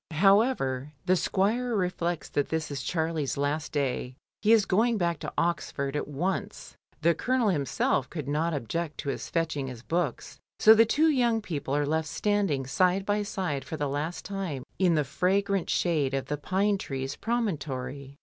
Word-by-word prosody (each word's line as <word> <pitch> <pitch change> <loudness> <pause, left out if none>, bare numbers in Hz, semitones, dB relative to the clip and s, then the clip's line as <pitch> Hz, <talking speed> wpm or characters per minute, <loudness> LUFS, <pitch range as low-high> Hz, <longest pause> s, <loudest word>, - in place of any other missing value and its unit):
However, 155 - +3
thie 185 - +4
squire 215 +7 +1
reflects 175 -3 -1
that 145 - -1
this 160 -2 -2
is 140 -2 -3
Charlie's 160 -3 -1
last 145 +2 -1
day, 130 -3 -2 0.3
he 215 - +3
is 220 -3 +6
going 225 +5 +2
back 170 -4 0
to - - -5
Oxford 150 -5 -1
at 150 - -2
once. 185 +8 -3 0.3
The 170 +1 +5
Colonel 250 +6 +1
himself 140 -4 0
could 150 -6 -5
not 155 +4 0
object 155 +3 -3
to 140 - -4
his* - - -4
fetching 160 -5 -1
his 125 -2 -8
books. 165 -5 -2 0.2
So 220 - +9
the 225 0 +5
two 315 +7 +3
young 240 -5 +2
people 145 -9 -3
are 145 0 +1
left 160 +2 0
standing 195 -5 0
side 180 +8 +2
by 205 0 +1
side 180 -9 -2
for 155 +4 -6
the 145 -1 -1
last 150 +5 -3
time 185 -10 -4 0.2
in 180 -3 +4
the 150 - +2
fragrant 195 +6 0
shade 150 -6 +1
of 135 - -2
the 150 - -3
pine 195 +6 +1
trees 135 -2 -4
promontory. 140 - -3
165 Hz, 175 wpm, -28 LUFS, 145-195 Hz, 0.3 s, So